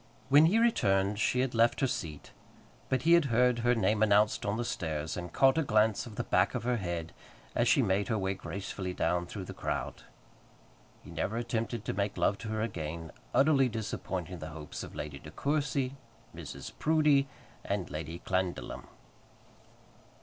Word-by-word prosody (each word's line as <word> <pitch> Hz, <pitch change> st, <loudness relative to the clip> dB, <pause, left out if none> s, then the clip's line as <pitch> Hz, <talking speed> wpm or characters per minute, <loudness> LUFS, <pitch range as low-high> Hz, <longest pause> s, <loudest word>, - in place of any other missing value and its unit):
When 145 Hz, +3 st, +7 dB
he 200 Hz, +7 st, +3 dB
returned 100 Hz, -, +2 dB
she 125 Hz, +3 st, +2 dB
had 130 Hz, -1 st, -1 dB
left 115 Hz, 0 st, +3 dB
her 135 Hz, -, +3 dB
seat; 80 Hz, -, -4 dB, 0.6 s
but 130 Hz, -1 st, 0 dB
he 165 Hz, +2 st, +5 dB
heard 125 Hz, -3 st, +2 dB
her 120 Hz, +1 st, +3 dB
name 105 Hz, 0 st, +1 dB
announced 105 Hz, 0 st, +3 dB
on 100 Hz, +2 st, 0 dB
the 120 Hz, -, -2 dB
stairs, 80 Hz, -6 st, -3 dB
and 90 Hz, -1 st, -6 dB
caught 135 Hz, +3 st, +4 dB
a -, -, +3 dB
glance 110 Hz, -3 st, +2 dB
of 110 Hz, -, -10 dB
the -, -, -2 dB
back -, -, +2 dB
of -, -, -2 dB
her 125 Hz, 0 st, +1 dB
head 85 Hz, -4 st, -4 dB, 0.4 s
as -, -, +2 dB
she -, -, +4 dB
made 100 Hz, +1 st, +1 dB
her 110 Hz, -, 0 dB
way 95 Hz, -1 st, 0 dB
gracefully 95 Hz, -1 st, -5 dB
down 90 Hz, 0 st, 0 dB
through 95 Hz, 0 st, -6 dB
the -, -, -7 dB
crowd. -, -, -3 dB, 1.0 s
He -, -, -12 dB
never 85 Hz, +7 st, -2 dB
attempted 115 Hz, -1 st, -2 dB
to -, -, -2 dB
make 100 Hz, +1 st, -2 dB
love 100 Hz, -, +1 dB
to 115 Hz, -, -7 dB
her 110 Hz, 0 st, -2 dB
again, 80 Hz, -5 st, -5 dB, 0.2 s
utterly 135 Hz, 0 st, +4 dB
disappointing 95 Hz, -5 st, -4 dB
the 80 Hz, -, -6 dB
hopes 75 Hz, -1 st, -7 dB
of -, -, -9 dB
Lady 75 Hz, -2 st, -5 dB
De -, -, -11 dB
Courcy, 140 Hz, -2 st, -1 dB, 0.4 s
Mrs. 80 Hz, -4 st, -8 dB
Proudie, 150 Hz, -3 st, +3 dB, 0.4 s
and 100 Hz, -3 st, -3 dB
Lady 80 Hz, +2 st, -5 dB
Clandidlem. 95 Hz, -1 st, -2 dB
105 Hz, 175 wpm, -31 LUFS, 90-125 Hz, 1.0 s, When